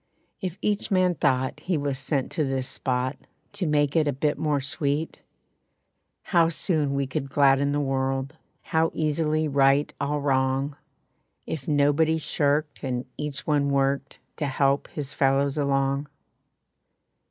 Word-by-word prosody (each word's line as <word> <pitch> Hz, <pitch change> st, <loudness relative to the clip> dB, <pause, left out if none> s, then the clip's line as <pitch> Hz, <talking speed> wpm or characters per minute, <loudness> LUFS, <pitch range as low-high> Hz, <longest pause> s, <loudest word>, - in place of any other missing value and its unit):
If 185 Hz, -2 st, -4 dB
each 210 Hz, 0 st, 0 dB
man 185 Hz, -3 st, +3 dB
thought 130 Hz, -3 st, 0 dB
he 175 Hz, +2 st, -1 dB
was 140 Hz, -2 st, -2 dB
sent 135 Hz, 0 st, -1 dB
to 155 Hz, -, 0 dB
this 135 Hz, -2 st, -1 dB
spot 130 Hz, +1 st, -1 dB, 0.4 s
To 200 Hz, -4 st, -2 dB
make 145 Hz, -1 st, +2 dB
it 155 Hz, -2 st, +3 dB
a -, -, +2 dB
bit 145 Hz, +3 st, 0 dB
more 150 Hz, -2 st, 0 dB
sweet, 145 Hz, +3 st, -2 dB, 1.0 s
How 170 Hz, -3 st, +3 dB
soon 155 Hz, -4 st, 0 dB
we 140 Hz, 0 st, 0 dB
could 135 Hz, +1 st, -4 dB
gladden 140 Hz, 0 st, +3 dB
the 145 Hz, -, 0 dB
world. 135 Hz, 0 st, -1 dB, 0.3 s
How 160 Hz, 0 st, +1 dB
easily 155 Hz, 0 st, +1 dB
right 140 Hz, 0 st, +3 dB
all 145 Hz, +1 st, 0 dB
wrong. 135 Hz, 0 st, 0 dB, 0.7 s
If 140 Hz, -5 st, -5 dB
nobody 150 Hz, +2 st, +3 dB
shirked, 150 Hz, -1 st, 0 dB
and 125 Hz, -2 st, -2 dB
each 150 Hz, -2 st, -4 dB
one 145 Hz, -2 st, +2 dB
worked 140 Hz, 0 st, 0 dB, 0.2 s
To 150 Hz, -, -1 dB
help 140 Hz, +1 st, +1 dB
his 145 Hz, -2 st, -5 dB
fellows 135 Hz, 0 st, +2 dB
along. 140 Hz, -1 st, 0 dB
145 Hz, 140 wpm, -25 LUFS, 135-150 Hz, 1.0 s, man